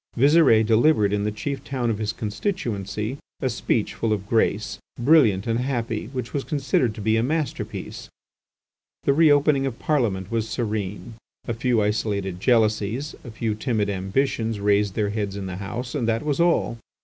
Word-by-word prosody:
Visire 140 -4 +5
delivered 110 -2 +3
in 105 0 0
the 105 - 0
chief 135 +6 -4
town 125 -4 -1
of 105 - -3
his 110 -1 -1
constituency 110 - -3 0.2
a 130 - 0
speech 110 -1 -1
full 115 - -1
of 100 -2 -1
grace, 110 -1 0 0.2
brilliant 120 -8 +4
and 115 0 0
happy, 120 -4 -2
which 125 -2 -5
was 140 - -1
considered 130 -6 0
to - - -7
be 110 +2 +2
a - - +2
masterpiece. 150 +4 -3 0.9
The 140 - +3
re 160 +2 +5
opening 145 -1 +3
of 125 -3 -5
Parliament 110 - 0
was 115 -1 -1
serene. 110 -1 -3 0.3
A 120 - -1
few 115 -1 +1
isolated 100 -3 -1
jealousies, 110 +4 +1
a - - -9
few 110 0 -2
timid 105 -2 -1
ambitions 110 +3 -1
raised 100 -1 +2
their 105 -2 0
heads 105 -2 -3
in 100 -1 -5
the 95 -1 -5
House, 120 +6 -5
and 125 -6 -1
that 115 0 0
was 150 -1 -1
all. 170 -8 +2
115 Hz, 175 wpm, -24 LUFS, 105-130 Hz, 0.9 s, Visire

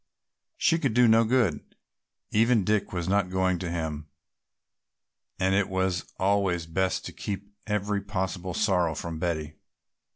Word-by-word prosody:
She 165 - +3
could 135 -8 0
do 125 0 +6
no 115 +1 +6
good; 115 - 0 0.6
even 115 0 +3
Dick 105 +2 0
was 90 -2 -3
not 100 -1 +2
going 95 -1 +1
to 90 -1 -4
him, 80 -3 -4 1.3
and 95 0 +2
it 100 0 +2
was 95 -1 -1
always 95 -3 +1
best 90 +2 -1
to - - -7
keep 100 0 -6
every 105 -1 -1
possible 95 -3 -3
sorrow 90 -7 +2
from 80 0 -5
Betty. 80 -3 -3
95 Hz, 140 wpm, -27 LUFS, 85-105 Hz, 1.3 s, do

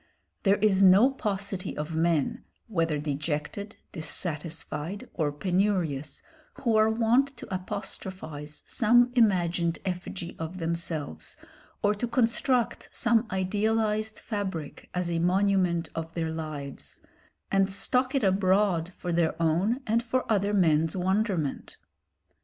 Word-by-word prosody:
There 195 0 +4
is 205 -2 +3
no 195 +7 +7
paucity 200 -6 -3
of 150 +2 -4
men, 165 -3 +1 0.2
whether 165 -7 0
dejected, 150 +7 -3 0.2
dissatisfied 160 +2 -4
or 155 -3 0
penurious, 175 -3 -1 0.3
who 235 -4 0
are 215 0 +5
wont 240 +4 +2
to - - -8
apostrophise 185 -5 -6
some 245 +1 +4
imagined 175 -7 +2
effigy 180 -1 -4
of 160 +3 -5
themselves, 165 - -4 0.5
or 205 - +4
to 210 +4 -3
construct 235 +1 +1
some 235 -1 +2
idealised 215 +3 0
fabric 190 -8 -5
as 180 -1 -1
a 165 - 0
monument 180 -2 +2
of 165 0 -5
their 165 -2 -1
lives, 155 -4 -6 0.5
and 195 0 +3
stalk 255 +7 +2
it 270 - +2
abroad 190 -2 +2
for 175 - -3
their 170 -1 +1
own 180 - +1
and 230 +1 +2
for 250 +2 -1
other 205 -1 +2
men's 165 -4 +3
wonderment. 190 -5 -1
185 Hz, 120 wpm, -28 LUFS, 165-215 Hz, 0.5 s, no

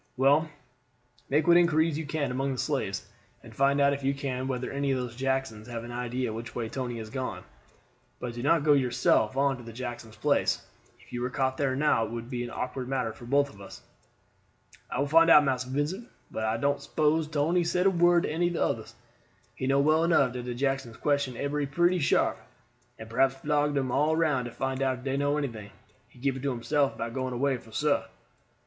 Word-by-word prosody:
Well, 145 +4 +4 0.8
make 150 +3 +2
what 175 -1 +6
inquiries 165 -2 +3
you 155 0 -4
can 145 -4 -1
among 135 +2 -1
the - - -6
slaves, - - -2 0.4
and - - -12
find 140 +1 +3
out 140 0 +4
if 140 0 -5
you 135 +1 +1
can 130 -2 -3
whether 125 -1 -3
any 140 0 -1
of 135 - +2
those 125 -2 -4
Jacksons 130 -4 -2
have 115 -2 -5
an 120 - -8
idea 125 -1 -3
which 115 0 -7
way 115 -2 -3
Tony 120 -1 -4
has 110 -1 -7
gone. 130 -1 -4 0.8
But 120 -1 -5
do 120 - -6
not 145 +3 +3
go 150 -1 +5
yourself 125 -3 +2
on 135 -3 +1
to 115 - -9
Jackson's 120 -2 -7
place; - - +1 0.3
if - - -19
you 120 - -3
were 125 - -1
caught 130 0 0
there 135 -2 0
now 145 -5 +2
it 110 - -3
would 115 +2 -6
be 120 -1 -2
an 120 - -5
awkward 125 +1 -4
matter 125 -4 -1
for 120 - -12
both 140 +3 +2
of 100 - -15
us." 100 - -11 1.1
"I - - -3
will 140 - +1
find 165 +3 +5
out, 150 -2 +8
Massa 130 -2 -1
Vincent; 155 - -2 0.2
but 110 - -3
I 110 +1 0
don't 140 +4 0
s'pose 155 0 +1
Tony 155 +4 +1
said 180 +2 0
a 195 - +6
word 175 -1 +4
to - - -2
any 170 +3 +1
of 175 - -2
the - - +1
others. - - -3 0.6
He 130 - -4
know 135 +1 +3
well 155 +3 +3
enough 155 -7 +3
dat 125 -1 -5
de 125 -1 -4
Jacksons 135 -3 -2
question 140 -3 0
ebery 145 +1 -1
one 135 - -18
pretty 175 +1 +3
sharp, 145 - +2 0.6
and 110 - -9
perhaps 130 +3 +2
flog 145 +1 0
dem 135 -2 0
all 150 +4 +2
round 150 -6 +1
to 120 - -6
find 135 +2 -3
out 130 -1 +1
if 130 - -13
dey 135 0 -1
know 145 +1 +1
anything. 115 -8 -4 0.4
He - - -23
keep 135 +1 -1
it 130 - -6
to 140 - -1
himself 135 +3 0
about 115 0 -4
going 130 -1 -3
away 135 +1 +1
for 115 - -16
suah." 145 +6 +1
135 Hz, 225 wpm, -28 LUFS, 125-145 Hz, 1.1 s, out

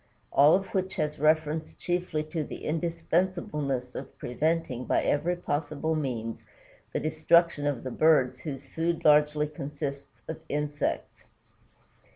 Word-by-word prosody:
All 145 +3 +7
of 195 +1 0
which 190 0 -1
has 150 -3 -2
reference 155 +1 +2
chiefly 175 -3 -1
to 160 -3 -1
the - - -8
indispensableness 165 -5 -1
of - - -8
preventing 140 -2 -1
by - - +2
every 170 +5 +1
possible 150 -1 -2
means 120 -7 -3 0.5
the - - -1
destruction 155 0 +3
of 140 -5 -1
the 130 - -4
birds 130 -4 +3
whose 140 -3 -6
food 165 +1 -2
largely 150 0 +5
consists 145 -1 -6
of 160 - -5
insects. 145 0 -2
150 Hz, 130 wpm, -28 LUFS, 145-165 Hz, 0.5 s, All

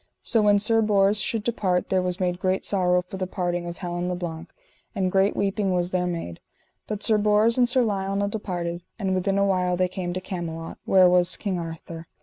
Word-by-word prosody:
So 225 - +3
when 205 -1 +4
Sir 225 +2 +3
Bors 205 -1 +3
should 215 +2 -1
depart 190 -6 -1
there 190 -1 +2
was 180 +1 -2
made 180 -1 -1
great 185 0 -1
sorrow 180 -2 +2
for 180 +2 -9
the 185 -1 -3
departing 175 -2 -3
of 170 - -6
Helin 175 -1 -3
le 180 - -2
Blank, 165 -2 -6 0.5
and 190 -2 0
great 195 +1 +2
weeping 195 -1 0
was 175 0 -1
there 180 -1 0
made. 165 - -5 0.5
But 210 -1 -4
Sir 215 -2 +3
Bors 210 +2 +3
and 245 -1 +3
Sir 250 0 +3
Lionel 200 -1 -1
departed, 175 -5 -4 0.2
and 195 -3 -1
within 190 +1 0
a 200 - +3
while 180 -2 +1
they 185 0 +2
came 180 -1 -4
to 185 - -2
Camelot, 170 -3 -6
where 185 -1 +5
was 180 0 +4
King 190 -4 -3
Arthur. 165 0 -8
185 Hz, 210 wpm, -24 LUFS, 180-200 Hz, 0.5 s, where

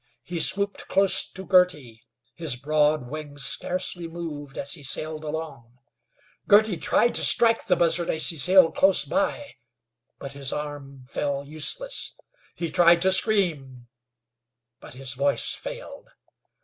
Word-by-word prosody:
He 175 +4 -5
swooped 200 +3 0
close 195 0 +2
to 190 0 -7
Girty. 150 - +1 0.3
His 155 -3 -2
broad 150 0 0
wings 145 -1 -4
scarcely 175 +3 -1
moved 155 -4 -8
as 140 - 0
he 160 - -7
sailed 155 +3 -2
along. 150 -6 -7 0.7
Girty 210 -1 +4
tried 240 - +1
to - - +3
strike 230 -1 +3
the 180 - +3
buzzard 170 0 +1
as 160 - +5
he 165 - +2
sailed 185 +2 +4
close 190 0 +3
by, 290 0 -2 0.6
but 140 - -8
his 140 -1 -3
arm 140 -3 -7
fell 140 0 -3
useless. 155 - -4 0.4
He 170 -2 -4
tried 170 -1 +5
to 190 - +3
scream, 150 - -1 0.9
but - - -13
his 130 0 -6
voice 140 +2 -1
failed. - - -9
155 Hz, 135 wpm, -24 LUFS, 140-185 Hz, 0.9 s, as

